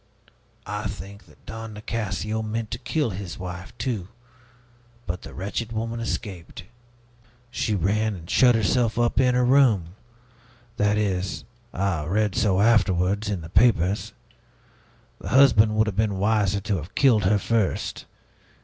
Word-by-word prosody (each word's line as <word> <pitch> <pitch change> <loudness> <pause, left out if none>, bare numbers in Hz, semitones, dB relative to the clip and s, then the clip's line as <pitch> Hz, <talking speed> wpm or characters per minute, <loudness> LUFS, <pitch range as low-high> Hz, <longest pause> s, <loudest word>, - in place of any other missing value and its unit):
I - - -3
think 100 +3 -9
that - - -22
Don 110 0 -7
Nicasio 110 0 -3
meant 110 0 -4
to 120 - -4
kill 145 -1 -1
his 90 -3 -6
wife, 90 +1 -7
too; 110 -9 -3 1.0
but 90 +1 -4
the - - -10
wretched 105 +5 -4
woman 115 +1 -3
escaped. 95 -6 -5 0.9
She 110 -3 -1
ran 105 +4 0
and 85 -2 -11
shut 125 +3 +5
herself 115 +1 +1
up 120 +1 +1
in 125 -1 +3
her 125 0 +3
room. 120 -10 +4 0.9
That 105 0 +2
is 95 -2 -1 0.3
I 95 -5 -1
read 105 +4 0
so 100 -2 +2
afterwards, 100 -2 +2
in 100 -4 -2
the 80 - -9
papers. 100 0 +2 1.1
The 90 - -7
husband 115 -4 +5
would 110 +1 +3
have 105 -3 -4
been 105 -3 +1
wiser 100 -1 +1
to 105 -2 -1
have 85 +4 -9
killed 115 -8 +4
her 105 +3 +4
first. 110 -1 -1
105 Hz, 145 wpm, -24 LUFS, 95-115 Hz, 1.1 s, shut